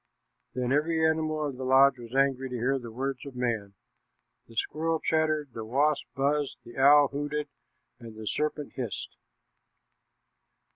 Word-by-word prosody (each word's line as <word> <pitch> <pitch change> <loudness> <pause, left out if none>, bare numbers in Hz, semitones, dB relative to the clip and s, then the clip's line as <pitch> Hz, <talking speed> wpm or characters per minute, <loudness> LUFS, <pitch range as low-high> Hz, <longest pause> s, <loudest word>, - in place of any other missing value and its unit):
Then 125 0 -1
every 160 +3 +2
animal 155 -1 0
in 140 -3 -4
the 130 - -5
lodge 130 0 +5
was 120 +1 -9
angry 135 -1 +2
to 125 - -5
hear 130 +3 0
the 120 -2 -9
words 130 +2 -3
of 140 -2 -9
man. 115 -5 -2 0.7
The 115 - -16
squirrel 160 +7 0
chattered, 155 -2 +1
the 110 - -5
wasp 140 +6 +1
buzzed, 140 +1 0
the 120 - -12
owl 145 +1 +6
hooted, 145 +1 -3 0.5
and 115 -2 -10
the 110 - -7
serpent 150 +4 -2
hissed. 120 -7 -5
135 Hz, 150 wpm, -28 LUFS, 125-150 Hz, 0.7 s, owl